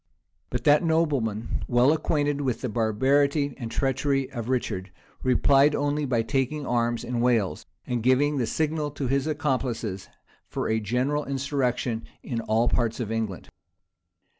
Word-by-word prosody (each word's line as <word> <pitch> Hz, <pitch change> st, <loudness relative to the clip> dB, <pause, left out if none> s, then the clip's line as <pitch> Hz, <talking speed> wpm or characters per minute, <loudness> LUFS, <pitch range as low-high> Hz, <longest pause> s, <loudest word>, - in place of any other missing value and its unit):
But -, -, -3 dB
that 150 Hz, +3 st, +5 dB
nobleman, 140 Hz, -10 st, 0 dB
well 125 Hz, +4 st, +4 dB
acquainted 145 Hz, -2 st, 0 dB
with 125 Hz, -5 st, -1 dB
the 125 Hz, -, -2 dB
barbarity 135 Hz, +6 st, +2 dB
and 115 Hz, -3 st, -4 dB
treachery 135 Hz, +1 st, 0 dB
of 120 Hz, -2 st, -5 dB
Richard, 100 Hz, -7 st, -2 dB, 0.3 s
replied 135 Hz, +3 st, +4 dB
only 145 Hz, +1 st, 0 dB
by 120 Hz, -4 st, +1 dB
taking 135 Hz, +3 st, -1 dB
arms 120 Hz, -1 st, 0 dB
in 120 Hz, -1 st, -2 dB
Wales, 120 Hz, -6 st, +1 dB, 0.2 s
and 120 Hz, -2 st, -2 dB
giving 135 Hz, +5 st, +3 dB
the 120 Hz, -, 0 dB
signal 155 Hz, +2 st, -1 dB
to 145 Hz, -1 st, -5 dB
his 135 Hz, +3 st, 0 dB
accomplices 130 Hz, -10 st, -2 dB, 0.4 s
for -, -, -3 dB
a 110 Hz, 0 st, +1 dB
general 125 Hz, +7 st, 0 dB
insurrection 130 Hz, -4 st, -1 dB, 0.2 s
in 115 Hz, -2 st, -3 dB
all 115 Hz, +2 st, +1 dB
parts 115 Hz, -1 st, 0 dB
of 115 Hz, -3 st, -3 dB
England. 110 Hz, -5 st, -3 dB
130 Hz, 145 wpm, -26 LUFS, 115-145 Hz, 0.4 s, that